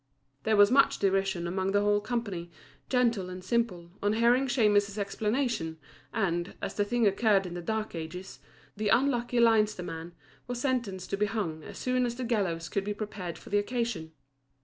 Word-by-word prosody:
There 220 -1 +3
was 205 +2 +7
much 275 +1 +5
derision 195 -2 +1
among 190 +2 -1
the 205 - +4
whole 205 0 +3
company, 205 -7 -3 0.4
gentle 235 -7 +2
and 185 0 -7
simple, 185 -5 -1
on 205 +1 +2
hearing 240 +4 +3
Shemus's 205 -5 +2
explanation, 210 -4 -1 0.3
and, 175 -5 -1
as - - -4
the 205 - +1
thing 235 +2 +1
occurred 200 -1 +3
in 175 - -6
the 175 - -5
dark 220 +4 -2
ages, 170 +3 -7 0.4
the 210 0 -1
unlucky 245 -1 +2
Leinster 215 -4 +4
man 165 0 -6 0.3
was 245 -1 -3
sentenced 235 -9 -2
to 195 - 0
be 210 +1 +2
hung 190 -8 -3
as - - -9
soon 255 -1 +1
as 240 - -4
the 255 - -4
gallows 190 -9 -1
could 200 - -1
be 205 +1 -3
prepared 205 -5 -5
for - - -13
the 205 - +4
occasion. 225 -7 -2
205 Hz, 180 wpm, -29 LUFS, 185-235 Hz, 0.4 s, was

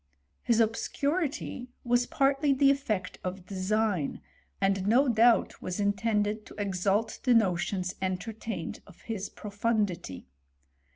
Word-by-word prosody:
His 235 -2 +2
obscurity 280 +4 -1 0.2
was 245 0 +2
partly 275 +1 +2
the 275 +1 +5
efifect 220 -10 -2
of 185 0 -5
design, 195 -3 0 0.4
and 195 0 +1
DO 260 +4 +4
doubt 230 0 +3
was 185 +2 -4
intended 210 +1 0
to - - -12
exalt 200 +2 0
the 250 -2 +4
notions 185 -3 +1
entertained 190 0 -4
of 190 - -17
his 210 -4 -4
profundity. 205 - -2
215 Hz, 115 wpm, -29 LUFS, 190-240 Hz, 0.4 s, the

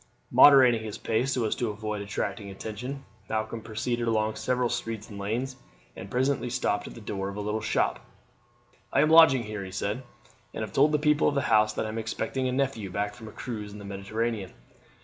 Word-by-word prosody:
Moderating 130 -5 +7
his 110 -2 -5
pace 120 +4 0
so 125 -3 0
as 110 - +1
to 120 - -2
avoid 105 0 -4
attracting 100 +1 -3
attention, 115 +8 -6 0.2
Malcolm 110 +1 -2
proceeded 120 +2 -2
along 110 -1 +1
several 125 -1 0
streets 115 -1 -4
and 100 - -8
lanes, 120 +6 -2 0.4
and 95 - -8
presently 130 +1 0
stopped 105 -4 -1
at - - -10
the - - -9
door 100 -2 -3
of 100 - -7
a - - -5
little 105 +1 -2
shop. 105 - 0 0.9
"I 140 - +4
am 155 +1 +3
lodging 160 -7 +7
here," 105 -2 -5
he 95 - -7
said, 100 +5 -2 0.5
"and - - -2
have 105 -2 -7
told 145 +5 +4
the 150 - +3
people 150 0 +3
of 145 - +1
the 140 - +2
house 110 0 +4
that - - -2
I - - -3
am 110 +1 -3
expecting 130 +4 -2
a - - 0
nephew 130 -6 -1
back 100 +2 -2
from 110 -2 -11
a - - -9
cruise 105 -4 -6
in - - -9
the 100 - -9
Mediterranean." 100 +1 -3
110 Hz, 210 wpm, -27 LUFS, 105-125 Hz, 0.9 s, Moderating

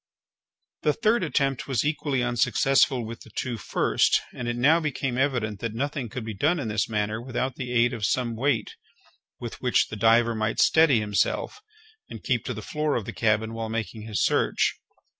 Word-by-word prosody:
The 150 - +2
third 230 +1 +1
attempt 135 -5 0
was 135 0 0
equally 145 -4 0
unsuccessful 125 +1 +2
with 115 +1 -8
the - - -13
two 120 -3 -4
first, - - +2
and 120 - -5
it 120 - -1
now 145 +7 +4
became 135 -5 -2
evident 125 -6 0
that 115 0 -4
nothing 140 -1 -3
could 125 0 -6
be 110 - -4
done 155 - +1
in 120 -6 -3
this 105 +1 -1
manner 105 +1 -1
without 130 +1 -3
the 125 -1 -6
aid 120 0 +3
of 110 - -6
some 120 -3 -1
weight 120 -2 -1 0.6
with 120 -2 -7
which 125 -1 +2
the - - -6
diver 115 +2 +4
might 110 0 -2
steady 160 -7 +5
himself, 105 - -1 0.5
and - - -9
keep - - 0
to - - -3
the - - -7
floor 150 -2 -1
of 110 - -2
the - - -6
cabin 110 0 +1
while 115 -1 -4
making 110 0 -4
his 105 -1 -2
search. - - +1
120 Hz, 190 wpm, -25 LUFS, 110-135 Hz, 0.6 s, steady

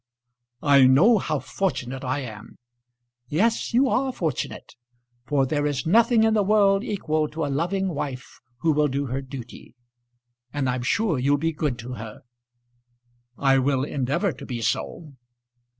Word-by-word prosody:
"I 140 -3 +6
know 190 - +5
how 155 -4 -1
fortunate 135 -7 -3
I 130 +2 -1
am." 110 -4 -10 0.7
"Yes, 220 - 0
you 255 +4 +3
are 260 +1 +1
fortunate. 160 - -4 0.5
For 140 -2 +2
there 145 +2 0
is 140 -2 -2
nothing 230 +5 +4
in 220 0 +3
the 215 - +3
world 200 0 +3
equal 155 -9 -1
to 155 +1 -4
a 140 - -2
loving 185 +6 -1
wife 140 -6 -6 0.2
who 165 - +3
will 150 0 +2
do 140 +1 -2
her 135 +1 -3
duty. 130 -3 -10 0.8
And 145 -2 -1
I'm 125 0 -1
sure 175 - 0
you'll 140 +3 +2
be 165 +3 -1
good 145 -5 -2
to 120 +2 -7
her." 110 -2 -10 1.1
"I 135 -1 +3
will 135 0 +1
endeavour 140 +7 -1
to - - -10
be 120 -2 -4
so." 155 +4 -3
145 Hz, 155 wpm, -24 LUFS, 130-195 Hz, 1.1 s, I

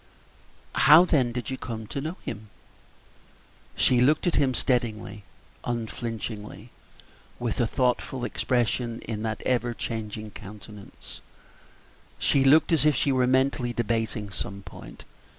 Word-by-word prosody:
"How, 155 +5 +7
then, 135 -8 +2
did 125 +2 -4
you 130 - -4
come 110 -2 -5
to 135 +6 -5
know 160 +6 -4
him?" 105 -1 -6 1.3
She 125 -1 +3
looked 150 +5 +3
at 175 - +2
him - - +2
for - - +4
a - - 0
moment 130 - -1
steadily, 110 -4 -1 0.4
unflinchingly, 115 -2 -5 0.7
with 120 -3 -3
a 120 - +2
thoughtful 125 +1 0
expression 120 -1 -1
in 105 -1 -4
that 110 0 -3
ever 120 -2 0
changing 110 -2 -5
countenance 105 0 -11 1.1
looked 140 +4 +5
as 160 -4 +4
if 150 -2 +4
she 140 - +2
were 130 -1 +2
mentally 130 -2 +1
debating 110 -2 -2
some 100 +1 -6
point. - - -11
120 Hz, 135 wpm, -26 LUFS, 110-130 Hz, 1.3 s, How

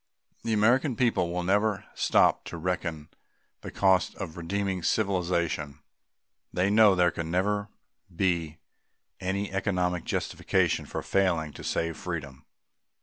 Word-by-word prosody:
The 115 - -1
American 120 +5 +3
people 110 -8 +1
will 90 0 -2
never 105 +2 +1
stop - - +3
to 85 - -6
reckon 80 -3 -3 0.5
the - - -7
cost 95 -2 +2
of 90 -5 -6
redeeming 95 +2 -2
civilization. 85 -6 0 0.7
They 95 +3 +1
know 105 -2 +6
there 90 -1 +3
can 80 -1 -5
never 100 +4 0 0.5
be 85 -4 0 0.6
any 100 +2 -2
economic 90 -3 0
justification - - 0
for - - -5
failing 85 -6 +1
to - - -10
save 85 -1 -1
freedom. 75 -7 -6
90 Hz, 125 wpm, -28 LUFS, 85-100 Hz, 0.7 s, know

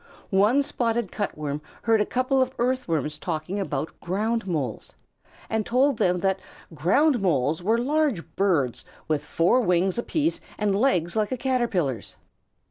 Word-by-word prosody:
One 210 +9 +4
Spotted 235 -7 -1
Cut 205 - -3
Worm 150 -1 -3 0.2
heard 225 -2 +3
a - - 0
couple 255 +1 +1
of 260 0 0
Earthworms 165 - -1
talking 170 +4 -3
about 155 -5 -3
Ground 215 +4 -1
Moles, 145 - -3 0.5
and 220 -1 0
told 255 +2 +2
them 180 -1 +2
that 195 -1 +1 0.3
Ground 245 - +3
Moles 155 -3 +1
were 220 +6 +2
large 275 - +1
birds 165 -11 +1 0.2
with 150 -2 0
four 170 +11 +2
wings 180 0 +1
apiece 315 +6 0 0.2
and 205 -2 +1
legs 180 -8 +2
like 215 -2 0
a 255 - -1
Caterpillar's. 225 - -1
200 Hz, 145 wpm, -25 LUFS, 165-245 Hz, 0.5 s, One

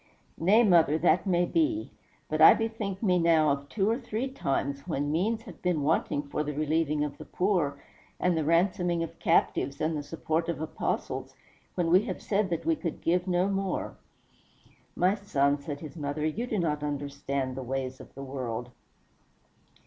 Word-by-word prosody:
"Nay, 205 +8 +5
mother, 170 -7 +5
that 180 +4 +2
may 175 -1 +3
be; 320 - 0 0.4
but - - -1
I - - +10
bethink 225 -3 -3
me 180 -4 +3
now 160 -3 +4
of 140 0 -3
two 200 -2 0
or 230 +3 +1
three 235 0 -3
times 140 - -2
when 145 -3 -1
means 215 +8 0
have - - -12
been 175 -5 0
wanting 145 -1 +1
for 145 +1 -3
the 150 0 -4
relieving 155 0 +1
of 150 -1 -5
the - - -8
poor, 175 -7 0 0.4
and 180 -1 +2
the 160 - 0
ransoming 170 +1 +2
of 165 - -8
captives, 140 0 +1
and 160 +1 0
the 150 - -2
support 160 +2 -2
of 165 -5 -2
apostles, 160 - -3 0.4
when 170 -2 0
we 185 +2 +7
have 190 -6 -4
said 205 -1 0
that 170 - -2
we 330 0 +3
could 175 - -4
give 175 +2 +1
no 180 +1 +2
more." 195 -1 -2 1.0
"My 185 +2 +3
son," 145 -9 +1
said 145 0 -6
his 150 -3 -8
mother, 150 -1 -3
"you 220 +11 -2
do 220 - -2
not 150 -5 0
understand 140 -2 -3
the 135 - -4
ways 130 +1 -4
of - - -15
the 135 - -7
world." 125 -3 -5
165 Hz, 180 wpm, -28 LUFS, 145-190 Hz, 1.0 s, I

